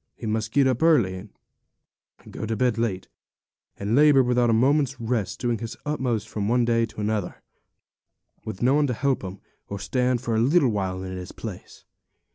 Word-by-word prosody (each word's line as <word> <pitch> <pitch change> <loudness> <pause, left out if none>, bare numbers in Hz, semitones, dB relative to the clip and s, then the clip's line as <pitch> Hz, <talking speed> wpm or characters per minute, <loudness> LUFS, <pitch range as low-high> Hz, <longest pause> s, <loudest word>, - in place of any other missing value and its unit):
He - - -9
must 110 0 -2
get 140 -1 +3
up 130 -2 +1
early, 145 - +4
and 95 +3 -9 1.0
go 110 - -5
to 115 - -1
bed 120 0 +1
late, 100 -5 -2 0.7
and 105 +3 -1
labour 145 -2 +6
without 125 -1 +2
a - - +4
moment's 135 +3 +2
rest, 115 -4 -2
doing 120 -3 -1
his 115 0 -6
utmost 125 -7 -1
from 105 -2 -3
one 120 0 +3
day 115 -1 +2
to 105 - -8
another, 105 -3 -2 1.0
with 95 - -6
no 130 +2 +4
one 145 0 +3
to 125 - -1
help 135 0 0
him, 95 +1 -7 0.3
or 100 - -4
stand 125 +5 0
for 120 -1 -3
a - - +2
little 135 +3 +4
while 95 -3 -2
in 95 0 -6
his 90 -1 -7
place. - - -9
115 Hz, 190 wpm, -25 LUFS, 105-130 Hz, 1.0 s, labour